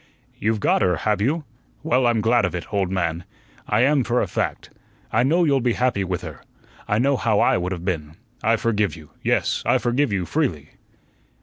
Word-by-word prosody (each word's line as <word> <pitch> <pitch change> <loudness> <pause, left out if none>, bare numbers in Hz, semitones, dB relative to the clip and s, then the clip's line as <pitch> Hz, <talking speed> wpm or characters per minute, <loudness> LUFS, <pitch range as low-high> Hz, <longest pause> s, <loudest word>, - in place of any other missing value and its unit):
"You've 110 0 0
got - - +2
her, 90 -3 +3
have 105 +5 -1
you? 150 +8 0 0.4
Well, 130 -5 +2
I'm 115 -2 +2
glad 120 +3 +3
of - - -1
it, 85 - -7
old 100 -3 +1
man. 85 -2 -1 0.4
I 105 +2 +2
am, 140 +1 +3
for 120 +1 +1
a - - +1
fact. - - -3 0.4
I 110 - +3
know 160 +8 +3
you'll 140 -4 +2
be 120 -1 +1
happy 125 -6 0
with 90 -2 -3
her. - - -8 0.5
I 105 - +1
know 135 +4 +2
how 110 -4 +1
I - - +4
would 90 +1 -3
have 90 -2 -5
been. 80 -4 -3 0.3
I 115 0 +3
forgive 105 -4 0
you; 80 -3 -14
yes, - - 0
I - - +3
forgive 125 +1 0
you, 95 -3 -1
freely." 85 - -2
110 Hz, 205 wpm, -22 LUFS, 90-125 Hz, 0.5 s, I